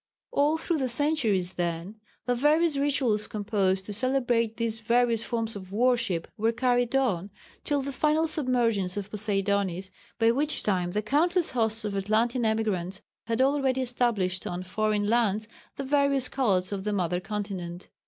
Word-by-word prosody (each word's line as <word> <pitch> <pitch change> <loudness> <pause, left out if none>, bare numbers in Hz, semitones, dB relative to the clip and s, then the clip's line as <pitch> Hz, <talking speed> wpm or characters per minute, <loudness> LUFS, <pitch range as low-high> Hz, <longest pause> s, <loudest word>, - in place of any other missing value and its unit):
All 295 +3 +2
through 325 0 -1
the 260 -2 0
centuries 235 - +1
then 175 +4 -3 0.3
the 245 - +1
various 300 +5 +3
rituals 270 -7 +1
composed 195 -3 0
to 210 - -6
celebrate 240 -1 0
these 225 -1 0
various 235 0 +2
forms 230 -2 -3
of 190 -2 -9
worship 230 -6 +1
were 225 +2 +2
carried 245 +1 +1
on, 205 -9 +1 0.3
till 285 -2 0
the 280 - -4
final 305 +3 +2
submergence 235 - 0
of 205 0 -5
Poseidonis, 195 -3 -1 0.3
by 230 0 +4
which 290 +5 +1
time 180 -4 0
the 210 +4 -2
countless 340 - +2
hosts 225 -2 0
of 205 -1 -3
Atlantean 225 +5 +1
emigrants 200 -4 -1 0.2
had 230 +2 0
already 270 -1 +1
established 230 -7 0
on 175 +1 -4
foreign 210 +2 0
lands 215 -1 +1 0.3
the 275 - -4
various 280 -1 +2
cults 195 -9 +1
of 195 -1 -3
the 210 0 -1
mother 180 -2 0
continent. 185 -3 -5
225 Hz, 155 wpm, -27 LUFS, 195-260 Hz, 0.3 s, by